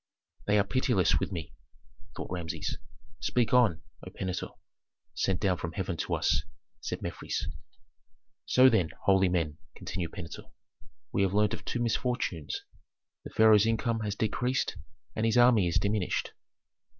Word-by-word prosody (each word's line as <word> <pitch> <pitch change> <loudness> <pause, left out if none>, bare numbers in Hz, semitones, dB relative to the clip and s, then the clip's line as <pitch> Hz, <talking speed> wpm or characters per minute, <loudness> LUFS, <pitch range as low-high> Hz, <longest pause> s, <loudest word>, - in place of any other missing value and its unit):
"They 105 0 +4
are 100 - +5
pitiless 115 -3 +2
with - - -3
me," 85 -4 -5 0.6
thought - - -6
Rameses. 85 -3 -3 0.4
"Speak 120 -2 +1
on, 115 -11 +4 0.2
O - - -7
Pentuer, 95 -1 -4 0.6
sent 95 -2 0
down 95 -3 +1
from 85 -1 -5
heaven 95 -1 -2
to - - -1
us," - - +2 0.4
said - - -5
Mefres. - - -3 1.0
"So 130 +1 +6
then, 110 -10 +3
holy 95 -1 +4
men," 80 -4 -1 0.2
continued 85 -3 -4
Pentuer, 85 -3 -8 0.6
"we - - +1
have 95 0 +1
learned 105 0 +3
of - - -5
two 120 - -2
misfortunes, 120 - -1 0.6
the - - -8
pharaoh's 110 -1 +5
income 115 0 0
has 105 -2 -2
decreased, 125 +5 0 0.4
and 110 - -1
his 115 +1 +2
army 120 -6 +6
is 85 - +1
diminished." 100 -2 0
100 Hz, 145 wpm, -29 LUFS, 90-115 Hz, 1.0 s, So